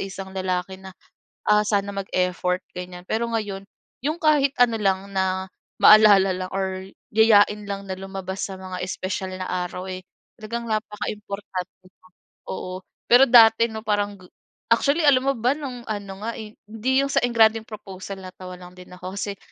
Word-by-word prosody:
isang 195 0 -6
lalaki 185 0 -3
na, 190 -1 -12 0.5
ah, 210 0 +4
sana 200 -1 0
mag-effort 185 -2 -1
ganyan. 180 0 -8
Pero 230 +2 0
ngayon, 205 -4 -4 0.4
'yong 310 +4 -1
kahit 290 -3 +3
ano 230 -2 +2
lang 195 -1 0
na, 190 -1 -1 0.3
maalala 205 -3 +7
lang 185 0 -5
or 190 0 -3 0.2
yayain 210 -1 +5
lang 200 -1 -6
na 190 - -3
lumabas 190 0 -6
sa 190 -1 -5
mga 185 -1 -6
espesyal 185 +1 -4
na 185 - -4
araw, 180 0 -4
eh, 185 0 -6 0.3
talagang 235 +2 -6
napakaimportante 205 -4 -5
na, 185 0 -23 0.4
oo. 185 0 -5 0.2
Pero 250 +3 +7
dati, 230 -1 +7
'no, 220 0 -8
parang 205 -1 0
g 185 - -16 0.4
actually 280 +7 +3
alam 265 -3 +5
mo 275 +1 +2
ba 245 +4 +2
no'ng 260 -5 -7
ano 205 -2 -4
nga, 230 - -3
eh 215 -1 -10
hindi 225 +4 -3
'yong 275 0 +1
sa - - +3
engrandeng 225 -2 +4
proposal, 195 -3 -8
natawa 185 -1 -10
lang 180 0 -13
din 180 0 -14
ako 180 +1 -8
kasi 200 0 -4
200 Hz, 165 wpm, -23 LUFS, 185-220 Hz, 0.5 s, maalala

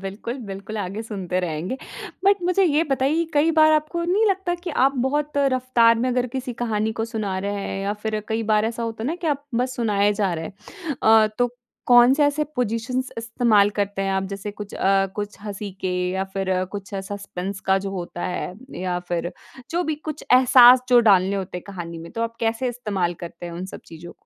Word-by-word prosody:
बिल्कुल, 200 +6 -5
बिल्कुल 200 +3 -7
आगे 200 +2 -4
सुनते 190 -5 -3
रहेंगे, 175 +6 -3 0.5
बट 400 +1 +6
मुझे 365 +2 +3
ये 315 -1 +3
बताइए 275 +5 +2
कई 300 +2 +3
बार 310 0 +7
आपको 310 +3 0
नहीं 380 +6 +2
लगता 380 -3 0
कि 350 0 -6
आप 275 - +4
बहुत 295 +2 -1 0.2
रफ़्तार 250 -3 +4
में 250 +2 0
अगर 250 0 +1
किसी 260 -1 -3
कहानी 220 -1 0
को - - +1
सुना 215 -5 -3
रहे 200 +2 -2
हैं, 195 - -4
या 200 +1 -1
फिर 215 -1 -1
कई 225 0 -1
बार 210 0 +3
ऐसा 230 +1 -3
होता 225 -1 -4
है - - -1
ना 315 - -1
कि 350 -1 -5
आप 285 -2 -1 0.2
बस 255 0 -4
सुनाए 205 -3 +2
जा 195 -3 +2
रहे 160 0 -4
हैं 310 - -8
अ, 220 0 +6
तो 245 -1 +2 0.4
कौन 245 +1 +7
से 295 +1 +3
ऐसे 290 +1 +1
पोज़िशन्स 250 +2 -1
इस्तेमाल 225 -3 +3
करते 200 -1 -1
हैं 195 - -1
आप? 190 - 0
जैसे 200 +1 -5
कुछ 205 0 -9
अ, 195 0 +2
कुछ 205 0 -4
हँसी 205 0 -6
के 185 - -1 0.2
या 190 +1 -1
फिर 190 -1 -1 0.2
कुछ 200 -1 -7
सस्पेंस 195 -1 -5
का 190 - +4
जो 195 0 -5
होता 175 -2 -5
है 180 0 -4 0.3
या 180 -1 -1
फिर 175 0 -2 0.4
जो 345 +2 0
भी - - 0
कुछ 310 -1 -5
एहसास 250 0 +8
जो 245 -1 +7
डालने 190 +1 +4
होते 185 -2 -4
हैं - - -12
कहानी 175 -4 -7
में, 165 +1 -9
तो 230 - -2
आप 230 0 -3
कैसे 230 +2 0
इस्तेमाल 205 -8 -2
करते 170 +1 -8
हैं 170 - -7
उन 175 +2 -5
सब - - -8
चीज़ों 165 +1 -10
220 Hz, 215 wpm, -23 LUFS, 195-255 Hz, 0.5 s, एहसास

